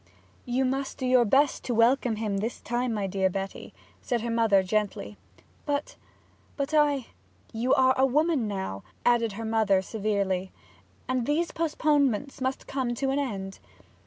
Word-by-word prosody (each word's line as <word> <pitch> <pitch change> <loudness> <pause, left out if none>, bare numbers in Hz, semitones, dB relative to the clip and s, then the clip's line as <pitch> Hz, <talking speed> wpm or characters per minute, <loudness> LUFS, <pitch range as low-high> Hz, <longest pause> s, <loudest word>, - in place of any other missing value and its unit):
'You 255 +2 0
must 270 +1 -2
do 260 - -3
your 250 -1 +4
best 275 +6 +2
to 245 - -1
welcome 235 +1 +3
him 210 -2 -2
this 220 +4 -3
time, 240 +1 -2
my 210 -3 -1
dear 190 0 +1
Betty,' 195 +1 -5 0.4
her 235 -2 0
mother 225 -4 +3
said - - -11
gently. 200 - -1 0.5
'But 290 0 -2 0.6
but 280 +1 -2
I 290 -4 +3 0.2
' 90 +2 -33
'You 235 +3 +2
are 260 0 +4
a 265 +1 +3
woman 295 -2 +1
now,' 190 - -4 0.2
added 235 -3 +3
her 225 +3 -6
mother 220 -3 +2
severely, 195 -3 -1 0.6
'and 255 -2 -1
these 325 +4 0
postponements 290 -6 0
must 260 +1 -2
come 255 -3 -2
to 270 +2 -1
an 275 - 0
end.' 195 -8 -4
240 Hz, 160 wpm, -27 LUFS, 205-270 Hz, 0.6 s, your